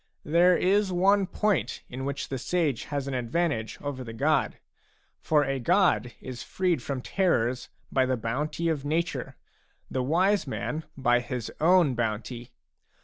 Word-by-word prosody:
There 175 Hz, +3 st, +5 dB
is 195 Hz, +1 st, +2 dB
one 195 Hz, +2 st, +3 dB
point 190 Hz, -, 0 dB
in 130 Hz, +2 st, -6 dB
which 140 Hz, 0 st, -3 dB
the 135 Hz, -, -3 dB
sage 150 Hz, -2 st, 0 dB
has 140 Hz, -1 st, -3 dB
an 140 Hz, -, -3 dB
advantage 125 Hz, -1 st, -1 dB
over 140 Hz, -3 st, -4 dB
the 115 Hz, -2 st, -8 dB
god; 150 Hz, +7 st, +1 dB, 0.6 s
for 150 Hz, -2 st, +2 dB
a 135 Hz, 0 st, -1 dB
god 175 Hz, -, +2 dB
is 130 Hz, -2 st, -7 dB
freed 180 Hz, -7 st, 0 dB
from 135 Hz, 0 st, -4 dB
terrors 125 Hz, -10 st, 0 dB, 0.2 s
by 130 Hz, -1 st, +2 dB
the 130 Hz, -1 st, 0 dB
bounty 140 Hz, +9 st, -2 dB
of 155 Hz, -4 st, -1 dB
nature, 165 Hz, +4 st, -2 dB, 0.6 s
the 130 Hz, -, 0 dB
wise 180 Hz, +7 st, +2 dB
man 155 Hz, +4 st, -3 dB
by 120 Hz, -2 st, +3 dB
his 120 Hz, -1 st, -5 dB
own 170 Hz, -4 st, +5 dB
bounty. 120 Hz, +1 st, -3 dB
140 Hz, 150 wpm, -27 LUFS, 125-175 Hz, 0.6 s, There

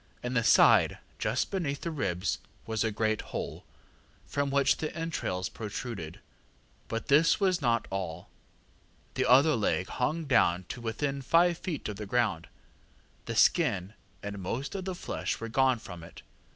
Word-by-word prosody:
In 125 Hz, +1 st, -2 dB
the 115 Hz, -2 st, +2 dB
side, -, -, +5 dB, 0.2 s
just -, -, 0 dB
beneath 150 Hz, -8 st, -2 dB
the 170 Hz, -, -3 dB
ribs, 95 Hz, -, -1 dB, 0.3 s
was 110 Hz, -1 st, -1 dB
a 110 Hz, -, +1 dB
great 110 Hz, 0 st, 0 dB
hole, -, -, -6 dB, 0.6 s
from 140 Hz, 0 st, -1 dB
which 140 Hz, 0 st, +3 dB
the 155 Hz, -, -3 dB
entrails 150 Hz, -, -2 dB
protruded. 105 Hz, -6 st, -6 dB, 0.7 s
But 115 Hz, -, -3 dB
this 155 Hz, +7 st, +5 dB
was 185 Hz, -4 st, +2 dB
not 115 Hz, -4 st, +1 dB
all. 90 Hz, -3 st, -4 dB, 0.9 s
The -, -, 0 dB
other 140 Hz, +5 st, +6 dB
leg 100 Hz, -4 st, 0 dB
hung 155 Hz, +6 st, -1 dB
down 95 Hz, -9 st, +3 dB
to 125 Hz, -, -6 dB
within 135 Hz, +5 st, -2 dB
five 170 Hz, +5 st, +3 dB
feet 165 Hz, -6 st, -4 dB
of 105 Hz, -2 st, -5 dB
the 105 Hz, -1 st, -6 dB
ground. 105 Hz, -7 st, 0 dB, 0.8 s
The -, -, -4 dB
skin 90 Hz, +4 st, +3 dB, 0.3 s
and 100 Hz, 0 st, -5 dB
most 120 Hz, -, -4 dB
of 190 Hz, -2 st, -4 dB
the 190 Hz, -1 st, -3 dB
flesh -, -, -3 dB
were 115 Hz, -, -5 dB
gone 130 Hz, +1 st, +3 dB
from 90 Hz, -6 st, -10 dB
it. -, -, -12 dB
120 Hz, 160 wpm, -29 LUFS, 100-145 Hz, 0.9 s, other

